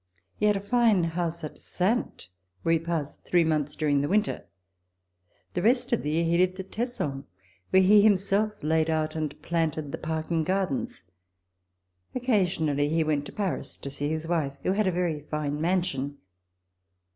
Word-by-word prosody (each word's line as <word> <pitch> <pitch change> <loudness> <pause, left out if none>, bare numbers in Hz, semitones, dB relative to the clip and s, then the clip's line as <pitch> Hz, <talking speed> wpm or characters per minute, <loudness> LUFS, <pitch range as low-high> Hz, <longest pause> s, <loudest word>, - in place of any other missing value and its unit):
He 210 - +2
had 210 -1 +3
a - - -4
fine 215 -3 +3
house 170 0 -1
at 155 - -7
Saintes, 190 - -1 0.3
where 165 - +3
he 165 - +3
passed 165 -3 -4
three 175 -1 +3
months 150 -2 0
during 145 -2 +1
the 145 - 0
winter. 210 - 0 1.1
The - - -1
rest 245 +4 +2
of 235 - +2
the 150 - -3
year 160 +2 +1
he 170 +1 +2
lived 185 +1 +2
at 190 - -7
Tesson 210 - -3 0.4
where 190 0 +5
he 205 +2 +7
himself 200 +1 +3
had - - -25
laid 160 +1 +2
out 155 -1 0
and 155 -2 -3
planted 160 -3 -1
the - - -5
park 160 +1 -3
and 165 -1 +2
gardens. 185 - -2 1.1
Occasionally, 175 - +1
he 160 +1 +2
went 150 -2 -1
to - - -9
Paris 200 -3 -3
to 140 - -7
see 145 +1 -2
his 160 +1 -3
wife, 150 -5 -1
who - - +1
had 205 +1 +1
a - - +3
very 175 -3 -1
fine 150 0 -3
mansion. 160 -6 0
165 Hz, 180 wpm, -27 LUFS, 150-190 Hz, 1.1 s, he